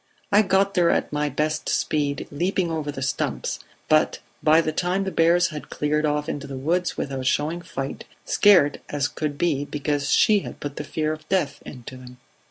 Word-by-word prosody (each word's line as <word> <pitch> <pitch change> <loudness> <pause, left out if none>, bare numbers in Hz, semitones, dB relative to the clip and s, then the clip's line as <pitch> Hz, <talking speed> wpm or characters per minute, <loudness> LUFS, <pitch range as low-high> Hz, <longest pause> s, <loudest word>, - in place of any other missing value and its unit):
I 205 - +6
got 195 0 +2
there 175 -3 +3
at - - 0
my 150 0 0
best 150 +3 -1
speed, 145 -2 -1
leaping 175 +3 0
over 155 -2 -2
the 135 -2 -5
stumps; 140 - -2 0.3
but 155 0 +3 0.2
by 155 +1 +5
that 155 -1 -1
time 180 +2 +1
the 190 - -3
bears 170 +1 +3
had 150 -2 -8
cleared 150 +1 0
off 150 0 -1
into 140 -1 -4
the 135 -1 -6
woods 175 +7 -1
without 135 -2 -3
showing 155 +6 0
fight, 140 -6 -6 0.2
scared 180 -9 +4
as 145 -1 0
could 145 -1 -4
be, 145 -5 +1
because 145 -1 -2
she 210 -2 +5
had - - -9
put 145 -1 -6
the - - -3
fear 155 +1 -2
of 155 0 -11
death 155 -7 0
into 130 0 -9
them." 125 0 -12
150 Hz, 190 wpm, -24 LUFS, 145-175 Hz, 0.3 s, I